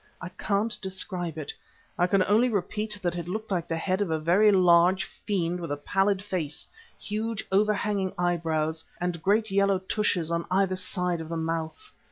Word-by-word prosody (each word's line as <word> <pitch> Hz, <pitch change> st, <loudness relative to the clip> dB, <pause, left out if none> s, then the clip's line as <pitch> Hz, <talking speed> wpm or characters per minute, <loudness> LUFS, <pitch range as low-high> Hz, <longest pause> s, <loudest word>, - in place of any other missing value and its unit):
I 180 Hz, -, -6 dB
can't 205 Hz, +4 st, -1 dB
describe 185 Hz, -3 st, -3 dB
it, 155 Hz, -, -5 dB, 0.4 s
I 175 Hz, -, +2 dB
can 190 Hz, 0 st, +3 dB
only 220 Hz, +6 st, +3 dB
repeat 210 Hz, +1 st, -2 dB
that 175 Hz, -1 st, 0 dB
it 170 Hz, -1 st, -5 dB
looked 215 Hz, +3 st, -4 dB
like 175 Hz, -3 st, -1 dB
the 165 Hz, -, -2 dB
head 185 Hz, +4 st, -1 dB
of 200 Hz, -, 0 dB
a 160 Hz, -, +1 dB
very 180 Hz, +7 st, +4 dB
large 180 Hz, 0 st, +5 dB
fiend 180 Hz, -3 st, -2 dB
with 170 Hz, -3 st, -5 dB
a 145 Hz, -, -1 dB
pallid 195 Hz, +5 st, +1 dB
face, 175 Hz, -7 st, -3 dB, 0.3 s
huge 220 Hz, +1 st, -3 dB
overhanging 200 Hz, -1 st, +1 dB
eyebrows 165 Hz, -3 st, 0 dB, 0.2 s
and 175 Hz, -2 st, -2 dB
great 210 Hz, +4 st, +2 dB
yellow 200 Hz, 0 st, +3 dB
tushes 185 Hz, -3 st, -1 dB
on 170 Hz, 0 st, -1 dB
either 190 Hz, 0 st, +2 dB
side 180 Hz, -2 st, -2 dB
of 160 Hz, -, -8 dB
the 165 Hz, -, -3 dB
mouth. 165 Hz, -, -3 dB
185 Hz, 180 wpm, -27 LUFS, 170-205 Hz, 0.4 s, large